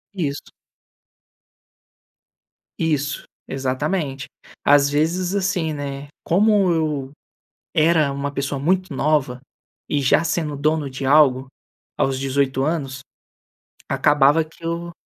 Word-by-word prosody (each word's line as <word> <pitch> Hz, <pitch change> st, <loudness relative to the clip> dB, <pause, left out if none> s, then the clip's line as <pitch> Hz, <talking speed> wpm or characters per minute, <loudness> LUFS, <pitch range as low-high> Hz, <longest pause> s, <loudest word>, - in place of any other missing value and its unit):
Isso. 145 Hz, -6 st, -3 dB, 2.4 s
Isso, 150 Hz, -3 st, -1 dB, 0.2 s
exatamente! 135 Hz, +1 st, -2 dB, 0.4 s
Às 145 Hz, 0 st, +5 dB
vezes, 175 Hz, +6 st, 0 dB
assim, 180 Hz, -5 st, 0 dB
né, 140 Hz, -1 st, -6 dB, 0.2 s
como 200 Hz, 0 st, +3 dB
eu 150 Hz, -5 st, -1 dB, 0.6 s
era 155 Hz, -2 st, +3 dB
uma 140 Hz, +1 st, -3 dB
pessoa 140 Hz, 0 st, -3 dB
muito 180 Hz, +2 st, 0 dB
nova, 135 Hz, -3 st, 0 dB, 0.5 s
e 145 Hz, -, 0 dB
já 140 Hz, +4 st, +3 dB
sendo 150 Hz, -4 st, -2 dB
dono 150 Hz, 0 st, 0 dB
de 135 Hz, +1 st, -6 dB
algo 135 Hz, -2 st, +4 dB, 0.5 s
aos 135 Hz, -1 st, 0 dB
18 135 Hz, 0 st, 0 dB
anos, 140 Hz, -4 st, -2 dB, 0.9 s
acabava 145 Hz, +2 st, +4 dB
que 160 Hz, +1 st, -19 dB
eu 170 Hz, +1 st, -3 dB
145 Hz, 105 wpm, -21 LUFS, 135-165 Hz, 2.4 s, Às